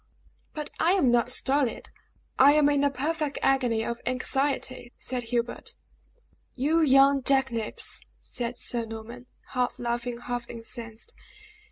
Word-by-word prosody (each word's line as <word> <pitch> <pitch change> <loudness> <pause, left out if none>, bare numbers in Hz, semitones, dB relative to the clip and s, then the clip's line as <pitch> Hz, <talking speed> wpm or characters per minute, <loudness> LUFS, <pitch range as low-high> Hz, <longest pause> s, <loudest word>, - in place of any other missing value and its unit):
"But 300 -1 -5
I 340 +3 +4
am 285 -11 +3
not 240 0 +2
stolid! 270 -1 0 0.5
I 280 +2 +8
am 295 -1 +5
in 285 -1 +2
a 285 - +4
perfect 295 +2 -2
agony 245 -5 +2
of 235 0 -4
anxiety," 255 -1 -1
said 250 -1 -4
Hubert. 235 0 -2 0.8
"You 300 +6 +2
young 275 -1 +5
jackanapes!" 260 -4 0 0.2
said 240 -1 -5
Sir 235 -2 0
Norman, 230 +3 -9 0.2
half 250 -1 -1
laughing, 240 0 -2
half 245 -1 -4
incensed. 230 - -7
255 Hz, 130 wpm, -27 LUFS, 235-280 Hz, 0.8 s, I